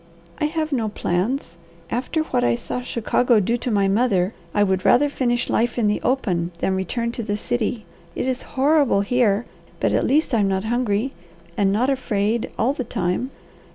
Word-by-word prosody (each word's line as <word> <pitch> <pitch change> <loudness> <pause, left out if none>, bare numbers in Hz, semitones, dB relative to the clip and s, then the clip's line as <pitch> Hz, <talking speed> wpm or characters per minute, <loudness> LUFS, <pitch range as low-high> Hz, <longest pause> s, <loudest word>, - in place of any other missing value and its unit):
"I - - +1
have 310 0 -2
no 230 -6 0
plans. 185 - -2 0.3
After 270 +6 -1
what 120 - -1
I 120 -1 +3
saw 250 - -4
Chicago 245 -1 +2
do 220 +4 +1
to 245 - -3
my 200 -3 +2
mother 200 -2 +2 0.2
I 205 - +2
would 190 -2 0
rather 285 +7 +4
finish 240 -3 0
life 235 +2 0
in 235 - +2
the 210 0 +1
open 185 -10 0
than 190 - 0
return 230 +6 -2
to 235 - -5
the 205 -2 -2
city. 230 -1 -2 0.3
It - - -2
is 260 0 -1 0.2
horrible 280 -6 +4
here, 225 0 +2 0.3
but - - +1
at - - +1
least 295 0 +2
I'm 210 -4 +3
not 190 0 0
hungry, 235 +1 0 0.4
and 195 -1 +2
not 245 +7 +2
afraid 225 -4 0
all 255 +5 +2
the 270 - -3
time." 200 +1 -2
230 Hz, 185 wpm, -22 LUFS, 200-255 Hz, 0.4 s, rather